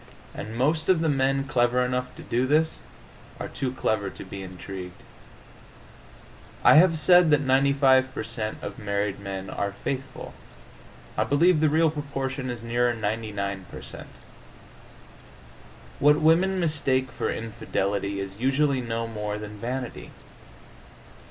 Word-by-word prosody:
And 110 +2 -7
most 155 +7 +1
of 180 -3 +4
the 165 - +1
men 135 -1 +1
clever 125 -2 +2
enough 125 0 -3
to - - -10
do 125 +2 0
this 155 +3 +2 0.6
are - - -4
too 130 -2 -3
clever 110 -5 -1
to - - -10
be 95 +1 -7
intrigued. 90 -1 -8 1.6
I - - +8
have 165 0 +6
said 175 +2 +6
that 150 -1 +4
95 135 -1 +3
per 130 - -4
cent. 115 -2 -4
of - - -6
married 100 -1 -2
men 95 -1 -6
are 100 +1 -3
faithful. 130 +6 -5 0.8
I - - +2
believe 165 +4 +3
the 155 0 +3
real 160 +1 +3
proportion 135 -3 -4
is 120 -2 -5
nearer 120 +1 +1
99 105 -3 -3
per - - -9
cent. - - -9 1.9
What 150 +1 +5
women 180 +5 +3
mistake 135 -6 +1
for - - -2
infidelity 100 -3 -2
is 100 +1 -6
usually 135 +1 +2
no 115 -1 -3
more 105 -2 -4
than 105 0 -8
vanity. 125 +2 -5
125 Hz, 140 wpm, -26 LUFS, 105-145 Hz, 1.9 s, I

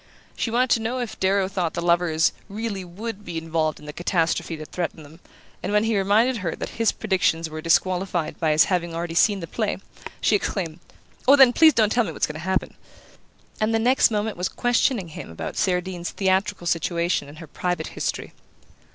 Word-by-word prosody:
She - - -2
wanted 245 +2 +1
to - - +4
know 230 +3 -2
if 235 -3 -5
Darrow 190 0 +2
thought 185 -4 -2
the - - -2
lovers 170 -2 +2 0.2
"really 205 -2 -4
would" 210 +4 -7
be 170 -3 -5
involved 160 -1 -1
in 150 - -14
the 150 - -7
catastrophe 170 -1 0
that 155 -1 -10
threatened 165 -3 -4
them, 155 +4 -15 0.4
and - - -3
when 210 +1 +3
he 225 0 +1
reminded 215 +6 +3
her 180 -6 -3
that - - -5
his 225 - +4
predictions 165 -5 0
were 155 0 -6
disqualified 175 0 0
by 160 - +1
his 150 0 +6
having 170 -3 -1
already 170 0 -3
seen 200 +3 +3
the - - -4
play, 215 +4 -2 0.4
she 215 - +3
exclaimed: 175 -5 -2 0.5
"Oh, 275 - +9
then, 265 -3 +7
please 315 -1 +6
don't 215 -3 +3
tell 240 +1 +3
me - - -4
what's - - 0
going 150 - -6
to 155 - -7
happen!" 185 +3 -1 0.9
and 215 +1 +1
the - - +4
next 245 +3 +4
moment 210 -2 -2
was 180 +1 -1
questioning 245 -5 +1
him 155 - -8
about 80 - -6
Cerdine's 180 -1 -1
theatrical 190 0 0
situation 170 -2 0
and 150 - -12
her 165 - -9
private 180 +4 -3
history. - - -4
185 Hz, 200 wpm, -24 LUFS, 165-215 Hz, 0.9 s, Oh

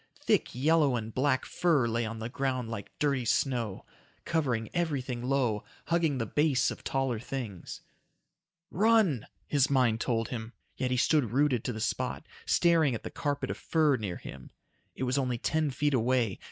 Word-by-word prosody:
Thick - - +1
yellow 145 0 +3
and 110 -1 -4
black 130 0 +1
fur 160 -9 +2
lay 115 0 -1
on 115 +1 -5
the 110 0 -4
ground 130 -2 -2
like 105 -3 -6
dirty 140 -4 +1
snow. 120 -4 0 0.4
Covering 130 -10 0
everything 140 -8 -1
low, 125 -5 0 0.3
hugging 165 -4 +2
the 115 - -1
base 145 +2 +2
of - - -9
taller 135 -4 -1
things. 115 -7 -6 0.9
"Run!" 205 - +3 0.2
his 140 -2 +2
mind 125 -5 +2
told 115 -2 0
him. 115 -1 -5 0.2
Yet 130 - -1
he 125 - 0
stood 140 -2 +3
rooted 135 -4 +2
to 125 - -1
the 110 - -6
spot, 125 +6 -2 0.2
staring 165 -7 +3
at - - -7
the - - -6
carpet 145 -1 -2
of - - -5
fur 155 -4 +2
near 100 -7 -4
him. 65 -1 -10 0.5
It - - -4
was 130 +2 +1
only 125 -3 -1
ten 155 +5 0
feet 145 +2 0
away. 120 -4 +1
130 Hz, 170 wpm, -29 LUFS, 115-145 Hz, 0.9 s, yellow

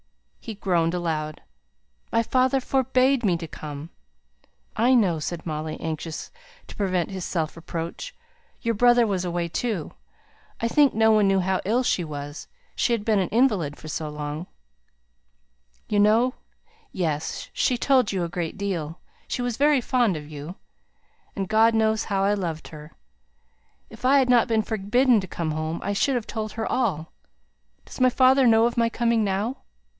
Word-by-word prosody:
He 225 - -7
groaned 175 -4 0
aloud. 155 -3 -3 0.7
"My 230 0 +2
father 260 +3 +2
forbade 260 0 +2
me 180 -5 +2
to 165 -1 -7
come." 150 +1 -8 0.8
"I 245 +4 +4
know!" 185 -9 +2
said 160 +2 -5
Molly, 155 -1 -4
anxious 160 0 -5 0.3
to - - -12
prevent 185 -3 -1
his 190 -2 -5
self 160 -4 -2
reproach. 165 - -6 0.5
"Your 230 - +1
brother 240 +2 +4
was 195 -4 -1
away, 175 -1 -2
too. 195 -1 -3 0.7
I 230 - 0
think 285 +2 +3
no 220 0 +4
one 210 -2 +4
knew 195 0 +3
how 190 +1 0
ill 235 +6 +1
she 185 - +1
was 145 -1 -7 0.3
she - - +1
had 215 -3 -2
been 215 -3 +3
an 185 - -1
invalid 205 - +1
for 155 - -11
so 155 0 -4
long." 150 +3 -5 1.4
"You 210 - +1
know 225 +5 +4 0.6
Yes! 155 -5 -3
she 250 - +1
told 255 -3 +3
you 190 -3 -1
a - - -1
great 170 +1 -4
deal 175 -5 -3 0.3
she 245 - -3
was 245 -2 -2
very 290 +2 +3
fond 240 - +1
of 150 -1 -9
you. 150 +4 -7 0.8
And 195 -1 -3
God 220 +2 +4
knows 220 0 +1
how 195 -2 0
I 200 +1 +3
loved 170 -6 -4
her. 150 0 -11 1.0
If - - -13
I 270 +2 +5
had 260 -2 +3
not 240 -2 +5
been 225 -2 +1
forbidden 225 +4 +2
to 190 - -6
come 165 -2 -3
home, 155 +1 -3
I 200 - -1
should 265 +6 +1
have 235 -2 -3
told 215 -2 -4
her 225 0 -3
all. 190 -11 -1 0.7
Does - - -9
my 255 - +6
father 260 +1 +4
know 225 0 +5
of 235 - 0
my 230 -1 +2
coming 230 -1 +1
now?" 205 +6 -1
205 Hz, 170 wpm, -24 LUFS, 165-235 Hz, 1.4 s, my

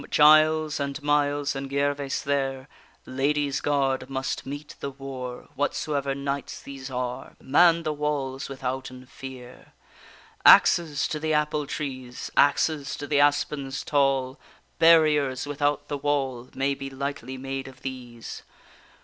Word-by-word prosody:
Giles 155 0 +5
and 140 0 -3
Miles 145 -1 +1
and 135 0 -5
Gervaise 140 0 -1
there, 135 -2 -1 0.4
Ladies' 140 +1 0
Gard 140 -2 0
must 135 0 -3
meet 145 +2 -7
the 140 - -4
war; 130 -2 -7
Whatsoever 140 -1 -1
knights 140 0 -4
these 135 -1 -9
are, 125 0 -4
Man 165 +4 +4
the 155 - -1
walls 140 -2 -2
withouten 130 -1 -5
fear! 130 -1 -11 0.7
Axes 155 -5 +6
to 155 - -3
the 155 0 0
apple 150 -1 0
trees, 130 -4 -5
Axes 145 0 +2
to 145 - -6
the 145 0 +1
aspens 145 -2 +1
tall! 135 -2 +1 0.4
Barriers 150 -5 +4
without 145 0 -1
the 145 -1 -3
wall 135 -4 -1
May 135 +1 +1
be 135 0 -6
lightly 135 -1 -5
made 135 0 -5
of 130 -1 -14
these. 125 -3 -7
140 Hz, 130 wpm, -26 LUFS, 135-145 Hz, 0.7 s, Axes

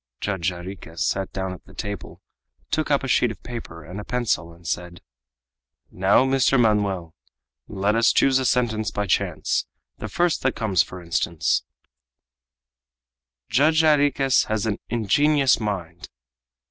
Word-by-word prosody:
Judge 95 -4 -1
Jarriquez 90 -1 -6
sat 95 -1 -1
down 95 -1 -3
at 90 - -12
the - - -17
table, 100 -1 -7 0.5
took 155 0 0
up 140 -2 +2
a - - -2
sheet 125 -1 +3
of 110 -4 -9
paper 115 -9 -8
and 90 +5 -7
a - - -6
pencil, 110 -9 -1
and 85 0 -14
said: 90 +2 -4 0.9
"Now, 95 +7 +3
Mr. 135 0 +3
Manoel, 100 -7 +1 0.5
let 100 +1 0
us 115 0 +4
choose 135 -1 +3
a 130 - -2
sentence 110 -4 +1
by 105 - -2
chance, 95 - 0 0.3
the - - -5
first 175 -1 +1
that 130 -2 0
comes; 100 -5 +2
for 90 -1 -6
instance: 85 -1 0 1.9
_Judge 155 +7 +4
Jarriquez 145 -4 +3
has 110 -1 -1
an 105 -2 -1
ingenious 135 +4 +3
mind. 90 -6 -5
105 Hz, 145 wpm, -23 LUFS, 90-130 Hz, 1.9 s, us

